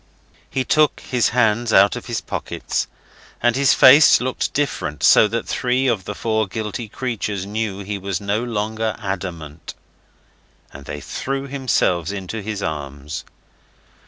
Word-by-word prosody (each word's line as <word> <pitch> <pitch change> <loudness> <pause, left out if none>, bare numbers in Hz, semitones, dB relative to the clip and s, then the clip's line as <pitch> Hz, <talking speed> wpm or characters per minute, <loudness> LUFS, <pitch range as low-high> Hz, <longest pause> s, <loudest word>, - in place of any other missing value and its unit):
He 130 - -1
took 155 +2 +2
his 125 -2 +1
hands 115 -1 +2
out 100 -1 +5
of - - -7
his - - -2
pockets, - - -3 0.5
and 120 0 +2
his 140 0 +4
face 145 +4 +8
looked 130 +1 -2
different, 100 - -2
so 110 - +7
that 115 +1 -3
three 125 +1 0
of 110 -8 0
the 105 - -5
four 110 -1 0
guilty 110 +3 -4
creatures 105 -6 -3
knew 105 -1 -3
he 100 0 -4
was 95 -1 -3
no 100 +2 -1
longer 110 -2 -2
adamant, 90 -6 -6 1.0
and 70 0 -11
they 75 0 -6
threw 135 - -4
themselves 115 - 0
into 100 +2 -5
his 100 -1 -4
arms. 70 -1 -5
105 Hz, 145 wpm, -21 LUFS, 95-120 Hz, 1.0 s, face